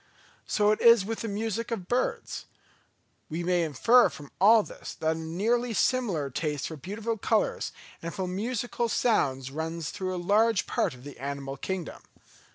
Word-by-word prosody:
So 210 0 +3
it 215 - 0
is 230 -4 +7
with 225 +1 -3
the 230 - -3
music 225 +2 -2
of 205 -7 -4
birds. 245 +4 -1 0.8
We 165 +2 -3
may 180 0 +2
infer 215 - +5
from 145 -2 -11
all 215 +2 +7
this - - -9
that 160 0 0
a - - -6
nearly 220 +9 0
similar 195 - +1
taste 150 0 -2
for 160 - -6
beautiful 210 - -4
colours 220 +2 0 0.3
and 170 - -4
for 185 +1 -3
musical 235 +4 -2
sounds 135 - +1
runs 160 +1 -4
through 185 -1 -3
a - - -3
large 205 +3 +3
part - - 0
of 125 - -15
the 145 -3 -10
animal 140 0 -4
kingdom. 180 +4 -5
190 Hz, 165 wpm, -28 LUFS, 160-225 Hz, 0.8 s, is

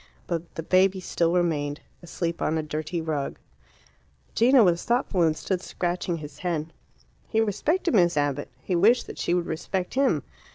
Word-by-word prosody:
But 170 -1 -4
the 165 - -4
baby 190 +2 +3
still 170 -2 0
remained, 150 -5 0 0.2
asleep 170 -1 -4
on 160 - +1
a 155 - -1
dirty 155 +3 -3
rug. 150 -3 -3 1.0
Gino 245 +1 +6
was 175 -3 +2
thoughtful, 235 -6 +1
and 160 -2 +3
stood 185 -2 -2
scratching 175 -1 -2
his 150 -2 -10
head. 165 -3 -2 0.5
He 220 - 0
respected 290 - +1
Miss 175 -6 +4
Abbott. 145 -1 0
He 180 - -1
wished 225 +8 +4
that - - -9
she 175 - +1
would 175 -1 0
respect 180 +3 -3
him. 270 +1 +2
175 Hz, 165 wpm, -26 LUFS, 160-190 Hz, 1.0 s, Gino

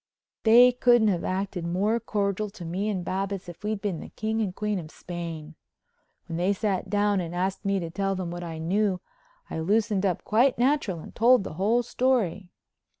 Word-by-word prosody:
They 240 +3 +8
couldn't 240 -3 +4
have 180 -4 0
acted 190 -1 -2
more 195 +7 +1
cordial 205 -2 -1
to 195 -4 -10
me 190 +6 -2
and 185 -4 -2
Babbitts 195 0 -3
if 175 +3 -11
we'd 210 -1 -2
been 195 -6 -2
the - - -9
King 220 +1 -2
and 190 -4 -2
Queen 210 -2 -1
of 155 -3 -8
Spain. 165 -3 -7 0.7
When 165 -2 -5
they 180 +4 +2
sat 195 -2 -2
down 205 0 +2
and 170 0 -5
asked 190 +3 -2
me 195 0 +1
to 165 -2 -5
tell 195 +2 -1
them 180 -2 -4
what 175 0 -5
I 165 -2 -6
knew 185 +4 0 0.5
I - - -3
loosened 205 +3 +1
up 185 -4 0
quite 240 +5 +3
natural 240 - +1
and - - -11
told 245 -1 +5
the - - -6
whole 215 +8 +2
story. 230 -8 0
195 Hz, 195 wpm, -26 LUFS, 175-215 Hz, 0.7 s, They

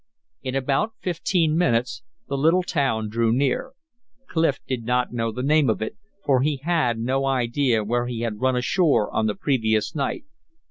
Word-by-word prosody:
In 130 -1 -4
about 135 - 0
fifteen 170 -2 0
minutes 125 -8 +1 0.3
the 140 - -2
little 165 +6 +3
town 135 -11 0
drew 115 +1 +1
near. 140 - 0 0.5
Clif 160 -5 +1
did 125 -3 -3
not 125 +1 0
know 115 -1 -1
the 125 +3 -5
name 150 -1 +3
of 110 - 0
it, 110 - -4 0.3
for 130 -3 +3
he 145 +1 +1
had 155 -9 +1
no 130 +4 0
idea 125 -2 +1
where 120 +3 -1
he 120 -2 -4
had 110 -3 -3
run 130 0 +2
ashore 130 - +2
on 110 - +2
the 105 - -1
previous 110 -3 0
night. 140 - -3
130 Hz, 175 wpm, -23 LUFS, 115-145 Hz, 0.5 s, little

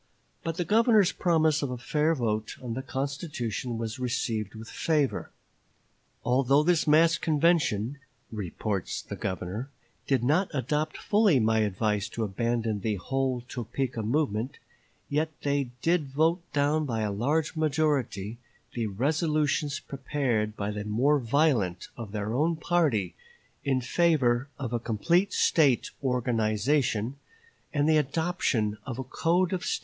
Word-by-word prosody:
But 165 0 -3
the 175 - -1
Governor's 215 -3 +4
promise 160 -4 +2
of 140 - -1
a 125 - -4
fair 150 +6 +1
vote 110 -4 -2
on 120 -3 -5
the 130 - -3
constitution 130 - -3
was 115 +1 -4
received 115 -4 -2
with 110 +1 -9
favor. 150 -1 0 1.0
"Although 135 +3 +3
this 170 -1 +2
mass 165 +2 +5
convention," 145 - +1 0.3
reports 100 -1 -3
the - - -6
Governor, 95 +7 -4 0.4
"did 130 -4 +2
not 160 +9 +2
adopt 150 +3 -1
fully 205 - +3
my 110 0 +2
advice 105 0 0
to 115 - -3
abandon 115 +1 -1
the 105 +1 -1
whole 130 +5 -1
Topeka 125 0 -4
movement, 120 0 -1 0.5
yet 155 +2 0
they 140 -2 0
did 165 -3 +2
vote 160 +6 +1
down 150 +1 +1
by 115 -3 -1
a 105 -1 0
large 145 +11 0
majority 140 -9 0 0.3
the 115 -2 -1
resolutions 150 - 0
prepared 125 -7 -2
by 100 0 -2
the 105 0 -4
more 125 +8 +2
violent 120 - +1
of 115 -4 -7
their 105 +1 -3
own 160 +6 +2
party 155 - +1 0.5
in 135 -2 +1
favor 130 -3 +2
of 130 -4 -4
a 120 - +1
complete 170 - +1
State 140 -7 +3
organization 125 0 +1 0.5
and 145 0 +1
the 155 -1 +5
adoption 140 - 0
of 125 -2 -4
a 130 - -3
code 175 +8 +1
of 185 - -2
State - - -2
laws." - - 0
130 Hz, 140 wpm, -28 LUFS, 110-155 Hz, 1.0 s, mass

